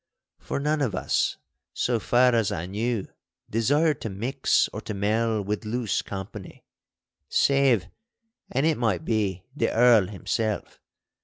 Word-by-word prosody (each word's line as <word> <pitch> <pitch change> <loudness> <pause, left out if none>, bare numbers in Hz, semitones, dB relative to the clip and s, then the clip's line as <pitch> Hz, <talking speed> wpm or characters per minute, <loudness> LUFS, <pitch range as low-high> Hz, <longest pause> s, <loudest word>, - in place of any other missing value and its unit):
For - - -4
none 150 +1 0
of 115 -9 0
us, - - 0 0.4
so 120 -2 0
far 125 +3 +3
as 115 -4 +2
I 80 - -3
knew, 105 +2 -2 0.4
desired 145 +8 +2
to 110 - -3
mix 110 +7 +1
or - - -5
to 105 - -5
mell 110 +2 0
with 105 +3 -3
loose 115 0 -1
company—save, 105 +4 -2 0.7
an' 135 +4 +1
it 160 -4 +2
might 110 -8 0
be, 100 -5 -1
the - - 0
Earl 115 -4 +5
himself. 105 +2 -3
115 Hz, 135 wpm, -26 LUFS, 100-125 Hz, 0.7 s, Earl